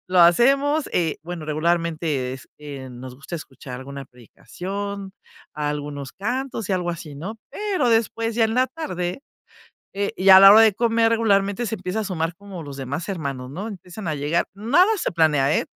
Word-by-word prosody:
lo 180 -1 +3
hacemos, 275 - +4
eh, 165 -3 0
bueno, 170 -1 -7
regularmente, 155 -4 -1
es, 135 - -12
que 140 -3 -8
nos 125 +1 -9
gusta 140 +6 -7
escuchar 130 -4 -9
alguna 140 +1 -8
predicación, 195 - -7 0.4
algunos 145 -2 -4
cantos 245 +1 -3
y - - 0
algo 175 -1 -1
así, 165 -3 -7
¿no? 190 +10 -7
Pero, 390 -11 -1
después 225 0 +1
ya 230 - +3
en 220 - 0
la 255 +1 +3
tarde, 220 - -4 0.7
eh, 200 +1 -2
y 190 +1 +3
a 190 0 +11
la 195 0 +10
hora 215 - +9
de 220 -3 +5
comer 230 0 +2
regularmente 205 0 +2
se 220 - -3
empieza 185 +2 -3
a - - -3
sumar 170 -4 -2
como 195 -2 -9
los 140 -3 -8
demás 140 +7 -4
hermanos, 140 -8 -4
¿no? 185 +11 -5
Empiezan 190 -1 -8
a 155 - 0
llegar, 150 +4 0
nada 270 - +3
se - - -2
planea, 150 -4 +3
eh, - - 0
180 Hz, 180 wpm, -23 LUFS, 150-220 Hz, 0.7 s, a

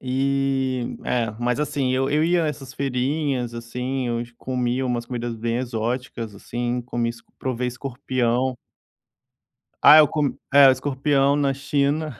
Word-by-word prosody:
E 135 -1 0
é, 120 -3 0
mas 120 +1 0
assim 145 -3 -1
eu 135 +1 0
eu 150 +1 +2
ia 170 0 +2
essas 135 -3 -6
feirinhas, 130 -2 -1
assim, 125 +2 -3
eu 120 0 -1
comia 125 0 -1
umas 120 -2 -2
comidas 120 -2 -4
bem 115 +1 -2
exóticas, 120 -2 -3
assim, 120 +4 -3
comi 120 -1 -2
s 115 0 -7 0.2
provei 125 -1 -2
escorpião. 125 -1 -1 1.2
Ah, 150 +2 +9
eu 155 - +8
c - - -16 0.4
é, 140 -1 +9
escorpião 140 +1 +1
na 140 -2 +1
China. 140 0 -1
130 Hz, 140 wpm, -23 LUFS, 120-140 Hz, 1.2 s, Ah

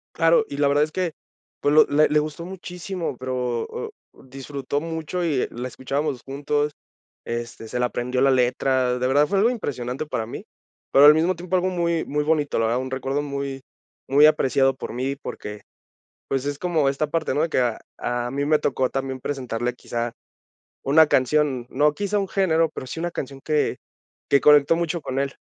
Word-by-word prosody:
Claro, 165 +6 +4
y 140 - -6
la 145 0 +3
verdad 145 +1 +3
es 155 - -8
que, 180 -2 -1 0.5
pues 145 +1 +2
lo 155 - +8
le 150 +2 +3
le 150 - +3
gustó 155 +2 -3
muchísimo, 180 -3 -5
pero, 125 -2 -2
o - - -6 0.3
disfrutó 135 +1 -4
mucho 165 +2 -3
y 145 -6 +1
la 125 +2 -5
escuchábamos 135 +1 -3
juntos, 145 +2 -1 0.5
este, 120 -1 -5
se 125 - -3
la 125 - +2
aprendió 125 +1 -2
la 135 0 +5
letra. 125 0 +2
De 125 - +1
verdad, 145 +3 +3
fue 200 - 0
algo 220 +5 +4
impresionante 135 - -3
para 115 -7 -3
mí, 115 - -8 0.5
pero 140 - +7
al 150 - +10
mismo 165 +4 +2
tiempo 180 +2 -3
algo 185 +1 +2
muy 170 -2 0
muy 150 +1 -1
bonito, 150 -3 +1
la 115 - +2
verdad. 120 +3 0
Un 130 0 -6
recuerdo 135 +2 -1
muy 140 -2 -4 0.5
muy 145 +2 +6
apreciado 135 -3 +3
por 130 - -7
mí, 130 +3 -2
porque, 105 -6 -8 0.7
pues, 135 0 -1
es 145 0 -3
como 160 -6 +1
esta 140 +3 -1
parte, 160 -2 -1
¿no?, 145 - +1
de 165 - +1
que - - +1
a 120 -3 0 0.2
a 120 0 -2
mí 140 +1 -1
me 155 +1 +3
tocó 130 -2 0
también 135 -1 -3
presentarle 125 -3 -3
quizá 120 -1 -4 0.7
una 155 +3 +5
canción, 135 -2 +2
no 150 0 +2
quizá 205 +4 -1
un 195 - -2
género, 165 -4 +2
pero 140 - -7
sí 160 - -6
una 175 0 -2
canción 135 -2 -6
que 150 -1 0 0.5
que 140 - +4
conectó 150 +1 +6
mucho 170 0 -2
con 130 -1 -3
él. 140 0 -2
145 Hz, 195 wpm, -23 LUFS, 130-160 Hz, 0.7 s, al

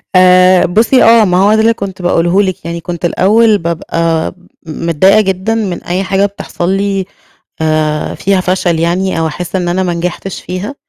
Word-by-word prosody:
آآ 185 0 +5
بُصّي 225 +8 +2
آه 230 -1 +5
ما 180 -2 +1
هو 200 +3 +3
ده 220 - +2
اللي 225 +1 +3
كنت 195 -4 -7
باقوله 175 +2 +1
لِك، 185 -4 -3
يعني 170 0 -5
كنت 175 0 -5
الأوّل 210 +5 +3
بابقى 165 -1 -2 0.3
م 160 +1 -7
متضايقة 190 +6 +4
جدًا 195 +3 -2
من 200 -6 -3
أي 185 +2 -2
حاجة 195 +1 +1
بتحصل 195 -3 -4
لي 195 0 -1 0.6
آآ 155 -1 -1
فيها 195 -1 0
فشل 180 -2 -1
يعني، 175 +2 -1
أو 165 - 0
أحس 175 +4 -5
إن 180 -1 -2
أنا 180 +2 0
ما 175 -2 -1
نجحتش 175 +2 -5
فيها. 185 +9 -6
185 Hz, 180 wpm, -12 LUFS, 170-200 Hz, 0.6 s, آآ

